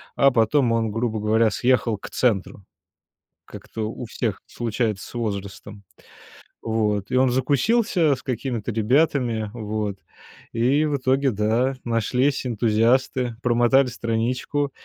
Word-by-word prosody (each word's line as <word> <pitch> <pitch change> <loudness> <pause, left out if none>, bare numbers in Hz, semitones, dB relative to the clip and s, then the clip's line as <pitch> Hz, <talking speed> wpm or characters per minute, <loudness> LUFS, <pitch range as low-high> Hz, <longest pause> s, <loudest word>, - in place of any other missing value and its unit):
а 140 0 +5
потом 120 +2 +2
он, 115 -1 0
грубо 115 0 -2
говоря, 110 +1 +2
съехал 120 -1 +1
к - - -9
центру. 105 -5 -1 0.8
Как-то 110 -1 -6
у 120 - -7
всех 115 -2 -3
случается 115 -3 -2
с - - -14
возрастом. 100 -2 -5 0.8
Вот, 105 -3 -1
и - - 0
он 130 0 +4
закусился 155 - +2
с 125 - -10
какими-то 120 -2 -3
ребятами, 115 -1 +1
вот, 105 -3 -3 0.6
и 130 +6 +2
в 150 -2 0
итоге, 135 +1 +1
да, 110 +5 +1
нашлись 125 +4 0
энтузиасты, 120 +2 +1
промотали 120 +3 +3
страничку, 125 +4 -2
120 Hz, 120 wpm, -23 LUFS, 110-130 Hz, 0.8 s, а